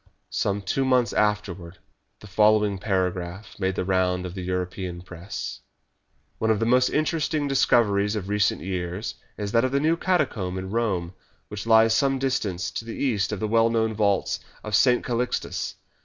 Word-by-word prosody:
Some 100 0 -1
two 135 +8 0
months 125 -4 +2
afterwards 100 -5 -1 0.4
the - - -12
following 105 0 +3
paragraph 95 0 -2
made 95 -1 0
the - - -2
round 90 -1 +1
of 90 - -6
the 95 - -6
European 90 -1 -4
Press: 90 +1 -7 0.8
"One 110 - 0
of 110 -2 +3
the 115 - +1
most 125 +2 +4
interesting 155 -1 0
discoveries 105 -6 +3
of 100 -3 -4
recent 105 -1 +1
years 90 +2 -3 0.2
is 105 -1 -3
that 115 +2 +3
of 130 - 0
the 140 - +2
new 160 +3 +2
catacomb 140 - 0
in 95 0 -5
Rome, 95 -6 -1 0.4
which 105 +1 -6
lies 110 0 +6
some 135 +3 +2
distance 105 -10 -1
to - - -4
the 115 0 -7
east 110 -8 0
of 105 - -3
the 110 - -1
well 115 +1 +3
known 110 -1 +1
vaults 100 -2 +1 0.2
of 110 - -6
St. 125 +2 +4
Calixtus. 125 0 -2
105 Hz, 170 wpm, -25 LUFS, 95-115 Hz, 0.8 s, lies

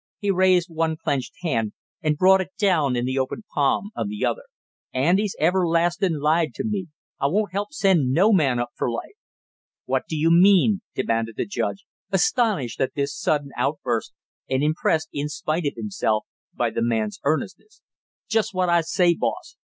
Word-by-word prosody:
He 205 -1 0
raised 185 -2 +3
one 160 -1 -1
clenched 135 -4 -2
hand 115 -10 -1 0.3
and 155 -1 0
brought 190 +2 +5
it 190 - -4
down 165 - +2
in 120 0 -1
the 130 +1 -1
opened 130 +11 -3
palm 150 +8 +1
of 110 -3 -2
the 105 0 -2
other. - - -2 0.5
"Andy's 180 +10 +1
everlastingly 175 0 +2
lied 155 +2 +1
to - - -3
me; 205 -4 -2 0.3
I 140 - +2
won't 205 +5 0
help 200 +7 -3
send 190 - +2
no 195 +10 +4
man 140 -9 +3
up 120 0 -2
for - - -2
life!" 115 - -5 0.7
"What - - -1
do 160 - -2
you 160 +2 +3
mean?" 195 +3 +5
demanded 115 -1 -1
the - - -1
judge, 200 0 -3 0.2
astonished 220 - +1
at 130 - -1
this 140 0 -2
sudden 145 -2 -1
outburst, 125 -6 -1 0.4
and 130 +1 +1
impressed, 155 +1 +1
in 145 +1 -2
spite 155 +1 -2
of 140 - -2
himself, 150 - -1 0.3
by - - -1
the - - -2
man's 110 -2 -1
earnestness. 160 - -3 0.4
"Just 220 -3 0
what 185 -1 +1
I 170 0 +4
say, 175 +1 +2
boss! - - -3
160 Hz, 175 wpm, -23 LUFS, 135-190 Hz, 0.7 s, brought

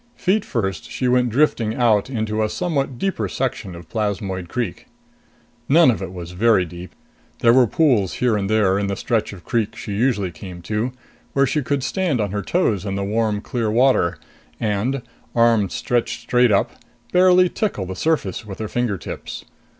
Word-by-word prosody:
Feet 195 +3 +1
first, 95 - -3
she 130 - -2
went 125 0 +3
drifting 115 -4 +1
out 115 -2 +2
into 110 -3 -1
a 110 - +1
somewhat 140 -7 -2
deeper 120 - -1
section 90 +1 -3
of 85 -1 -11
Plasmoid 100 -4 -3
Creek. 120 -7 -4 0.8
None 155 -1 +6
of 110 - -4
it 95 - -5
was 90 -2 -7
very 100 0 +3
deep. 90 +1 -10 0.5
There 115 0 +6
were 125 -1 +5
pools 120 - +2
here 125 -3 +1
and 100 -1 -1
there, 100 -3 +3
in 100 - -1
the 100 - -1
stretch 115 +2 -1
of 95 -4 -11
the - - -36
creek 110 -2 0
she 115 -2 -7
usually 105 -4 +1
came 90 +1 -10
to, 110 +7 -1 0.4
where 140 0 +4
she 150 +3 0
could 140 0 -1
stand 175 -5 0
on 105 -3 -1
her 105 0 -2
toes 110 - 0
in 100 -2 -3
the 100 - -2
warm 105 0 0
clear 115 -1 -2
water 120 -6 +3 0.4
and, 115 +5 -1 0.3
arms 115 -5 +3
stretched 120 -1 -1
straight 125 0 +3
up, 100 - +2 0.4
barely 180 0 +6
tickle 180 - -2
the 95 +1 -6
surface 120 - -1
with 100 -3 -8
her 110 - -4
finger 120 -3 -1
tips. - - -7
110 Hz, 185 wpm, -21 LUFS, 100-125 Hz, 0.8 s, None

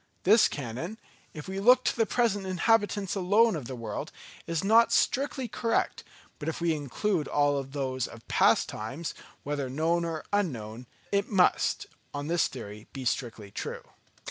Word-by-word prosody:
This 215 +4 +6
canon, 145 - -5 0.3
if 150 +1 -9
we 190 +1 -4
look 250 +5 +6
to - - +1
the 225 -2 +2
present 205 -1 +1
inhabitants 205 0 +1
alone 205 +3 +3
of 145 -6 -5
the 130 +1 -6
world, 115 -3 -5 0.4
is 165 0 -1
not 225 +3 +5
strictly 265 -1 +1
correct; 230 0 -1 0.4
but 150 - -2
if 160 - -4
we 170 -1 +2
include 155 - -1
all 145 -1 +2
those 130 -2 -3
of 115 -1 -13
past - - +4
times, 135 +10 -5 0.3
whether 140 -2 -2
known 165 +5 +1
or 165 -2 -4
unknown, 125 - -2 0.2
it 200 0 +1
must 190 -4 +2 0.3
on 145 0 -3
this 170 +2 +2
theory 105 -3 -9
be 135 -2 -6
strictly 115 -5 -2
true. - - -5
165 Hz, 160 wpm, -28 LUFS, 130-205 Hz, 0.4 s, This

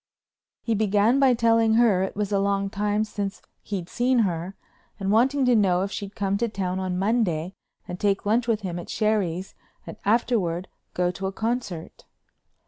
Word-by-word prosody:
He 230 - 0
began 215 +4 +3
by 265 -3 +5
telling 230 -1 +3
her 225 -6 +4
it 190 - -2
was 210 0 -2
a 200 - +2
long 200 0 0
time 210 +1 0
since 205 -2 -4 0.2
he'd 190 -4 -5
seen 250 +4 +1
her 175 +1 -3 0.4
and 195 0 -1
wanting 260 +5 +3
to 250 -1 +4
know 185 -4 +3
if 195 - -4
she'd 200 -1 -6
come 200 -2 -1
to 235 0 0
town 190 -3 -2
on 185 -1 -2
Monday 190 -5 0 0.3
and 180 - -6
take 200 -1 0
lunch 230 +3 +1
with 225 -2 +1
him 175 -3 -4
at 175 - -9
Sherry's 195 -4 -1 0.3
and - - -9
afterward 200 -6 +1 0.3
go 180 0 +1
to 190 +1 -4
a - - -3
concert. 220 -6 -4
200 Hz, 180 wpm, -25 LUFS, 190-225 Hz, 0.4 s, by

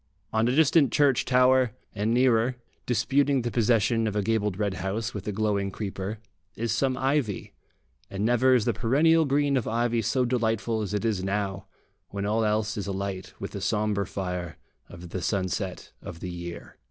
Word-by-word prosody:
On 110 +1 +2
a 125 - +1
distant 150 -3 +4
church 140 -4 +3
tower, 125 -2 +4 0.2
and 105 +2 -1
nearer, 125 0 +3 0.3
disputing 135 +3 +2
the 120 - -2
possession 115 0 +2
of 105 - -3
a 105 - +1
gabled 105 -3 0
red 100 -2 -1
house 110 +5 -2
with 105 - -6
a - - 0
glowing 100 -1 0
creeper, 100 +1 -5 0.4
is 115 0 -2
some 130 +3 +1
ivy; 135 -6 -1 0.6
and 100 +2 -2
never 125 +2 +4
is 115 -3 +2
the 120 - +1
perennial 150 +9 +3
green 140 0 +2
of 125 - -2
ivy 115 0 +1
so 125 +4 +1
delightful 115 -2 0
as 105 0 -3
it 105 - -2
is 105 -5 0
now, 95 0 -2 0.4
when 100 0 -4
all 110 +2 +1
else 110 0 0
is 100 - -3
alight 95 -1 -4
with - - -5
the - - -6
sombre 105 -2 0
fire 90 -3 -4 0.3
of 85 0 -10
the 95 - -4
sunset 95 0 -2
of 85 - -9
the 90 - -5
year.... 85 -1 -8
110 Hz, 180 wpm, -26 LUFS, 100-125 Hz, 0.6 s, distant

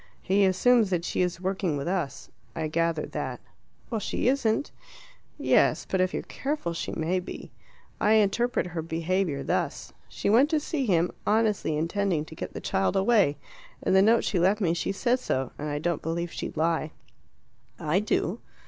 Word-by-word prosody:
He 195 +1 +3
assumes 220 +3 +4
that 175 -2 -1
she - - -1
is 180 -1 -1
working 185 -4 -1
with 140 - -4
us: 175 -7 -2 0.3
I 160 -1 -2
gathered 165 0 0
that." - - -4 0.5
"Well, 225 - 0
she 210 - -1
isn't." 255 -1 +1 0.7
"Yes; - - +3
but 190 - +1
if 185 0 +2
you're - - -3
careful 275 - -3
she 165 - -4
may 170 +3 0
be. 180 - -8 0.5
I 210 - +4
interpret 220 +4 +2
her 175 -2 -4
behaviour 165 -2 -1
thus: - - -2 0.2
She - - -4
went 240 +8 +5
to 315 -2 +2
see 295 -3 -2
him, 175 -2 +2 0.2
honestly 210 -7 +2
intending 170 0 0
to 160 - -11
get - - -6
the - - -3
child 195 0 0
away. 195 -7 +3 0.5
In - - +1
the 190 - +6
note 225 +3 +4
she 190 - 0
left 190 +5 +3
me 175 -5 +2
she 175 - -1
says 240 +5 +1
so, 130 - -1
and 150 +1 -3
I 145 - -2
don't 170 +1 -1
believe 170 +1 -3
she'd - - -6
lie." 160 -1 0 0.9
"I 155 +5 +1
do." 205 0 -1
185 Hz, 180 wpm, -27 LUFS, 165-210 Hz, 0.9 s, the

